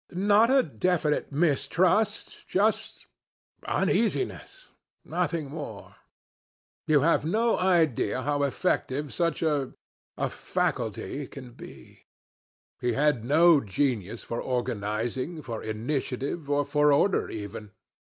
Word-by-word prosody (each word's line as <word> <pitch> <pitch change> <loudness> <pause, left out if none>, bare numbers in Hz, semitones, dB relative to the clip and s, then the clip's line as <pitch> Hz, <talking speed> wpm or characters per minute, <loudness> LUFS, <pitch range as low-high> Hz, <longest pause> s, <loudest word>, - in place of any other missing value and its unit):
Not 205 +5 +4
a 265 0 +5
definite 150 +3 0
mistrust 175 +8 +1
just 210 +3 0 0.6
uneasiness 375 - -1 0.4
nothing 155 -5 -2
more. 145 -10 -8 0.9
You 150 -2 +4
have 165 +4 +3
no 225 +8 +1
idea 160 - +2
how 145 0 0
effective 145 -1 -1
such 165 -2 0
a... 145 -4 0 0.4
a... - - 0
faculty 130 +6 -3
can 130 -3 -10
be. 120 - -14 0.7
He 125 -1 0
had 145 -3 +2
no 155 +4 +5
genius 110 -1 -1
for 115 - -4
organizing, 120 +5 -3
for 115 -4 -5
initiative, 130 +6 -3
or 145 0 +1
for 150 +1 +3
order 185 +7 +2
even. 105 0 -7
145 Hz, 105 wpm, -27 LUFS, 125-170 Hz, 0.9 s, a